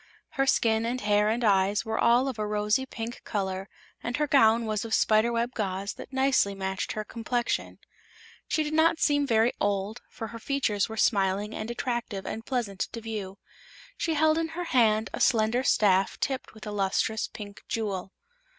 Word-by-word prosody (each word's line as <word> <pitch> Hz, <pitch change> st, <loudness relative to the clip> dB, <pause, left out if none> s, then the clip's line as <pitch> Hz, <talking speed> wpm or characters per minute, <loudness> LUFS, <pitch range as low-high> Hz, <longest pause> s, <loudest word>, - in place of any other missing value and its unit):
Her 270 Hz, 0 st, 0 dB
skin 225 Hz, -3 st, +3 dB
and 240 Hz, +2 st, -1 dB
hair 210 Hz, -1 st, +2 dB
and 235 Hz, +2 st, 0 dB
eyes 200 Hz, 0 st, +3 dB
were 220 Hz, 0 st, -2 dB
all 245 Hz, +3 st, +4 dB
of 255 Hz, -5 st, -4 dB
a 210 Hz, -, -1 dB
rosy 210 Hz, +5 st, 0 dB
pink 230 Hz, -1 st, -6 dB
color 190 Hz, -2 st, -3 dB, 0.3 s
and 245 Hz, +1 st, -3 dB
her 300 Hz, -, +1 dB
gown 230 Hz, -5 st, +4 dB
was 215 Hz, -1 st, -1 dB
of 225 Hz, -1 st, 0 dB
spider 215 Hz, +2 st, +3 dB
web 235 Hz, +1 st, -1 dB
gauze 195 Hz, -1 st, -3 dB
that -, -, -11 dB
nicely 265 Hz, -7 st, +2 dB
matched 190 Hz, -1 st, -3 dB
her 215 Hz, -, -3 dB
complexion. 235 Hz, +2 st, -2 dB, 0.7 s
She 310 Hz, -, +1 dB
did 300 Hz, 0 st, -4 dB
not 320 Hz, +1 st, +4 dB
seem 290 Hz, -1 st, +2 dB
very 225 Hz, 0 st, +3 dB
old, 205 Hz, +3 st, -1 dB
for 225 Hz, -2 st, -7 dB
her 230 Hz, +1 st, -8 dB
features 230 Hz, -6 st, 0 dB
were 220 Hz, -, -7 dB
smiling 200 Hz, 0 st, +1 dB
and 215 Hz, -, -5 dB
attractive 235 Hz, -5 st, -3 dB
and 225 Hz, -, -5 dB
pleasant 225 Hz, -7 st, -3 dB
to 230 Hz, -, -4 dB
view. 210 Hz, -4 st, -6 dB, 0.6 s
She 325 Hz, -2 st, -1 dB
held 315 Hz, +1 st, +3 dB
in 330 Hz, -, -1 dB
her 355 Hz, -, -1 dB
hand 220 Hz, -3 st, +3 dB
a -, -, -4 dB
slender 225 Hz, +1 st, +3 dB
staff 195 Hz, -6 st, +3 dB
tipped 265 Hz, -4 st, -3 dB
with 220 Hz, -, -11 dB
a 210 Hz, -, -5 dB
lustrous 205 Hz, +2 st, 0 dB
pink 205 Hz, -2 st, -10 dB
jewel. 195 Hz, -4 st, -3 dB
220 Hz, 185 wpm, -27 LUFS, 205-245 Hz, 0.7 s, all